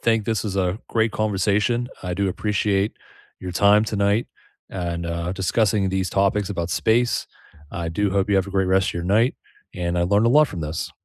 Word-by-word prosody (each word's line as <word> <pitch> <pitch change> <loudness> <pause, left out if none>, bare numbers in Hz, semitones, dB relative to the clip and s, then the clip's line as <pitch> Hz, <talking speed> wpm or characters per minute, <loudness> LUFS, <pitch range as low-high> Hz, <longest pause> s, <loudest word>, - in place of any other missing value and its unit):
think 115 -2 +1
this 110 0 -1
was 100 -3 -3
a 95 +1 0
great 110 -1 +1
conversation. 105 +3 0 0.2
I 90 -1 -2
do 100 +1 0
appreciate 105 +1 0 0.4
your 90 - -5
time 100 +4 +4
tonight, 105 +1 0 0.4
and, 85 -2 -4
uh, 85 +1 -3
discussing 95 +1 +1
these 95 0 -1
topics 100 0 +1
about 85 -3 -3
space. 120 +7 +1 0.5
I 85 -1 -3
do 100 +4 0
hope 100 +1 0
you 100 - +4
have 95 0 +1
a - - -7
great 95 -1 +1
rest 95 +1 +2
of - - -10
your 85 - -3
night, 110 +7 +2 0.4
and 85 0 -2
I - - +2
learned 100 +5 +2
a - - +4
lot 150 +3 +6
from 90 - -6
this. 75 +1 -4
100 Hz, 200 wpm, -22 LUFS, 90-105 Hz, 0.5 s, lot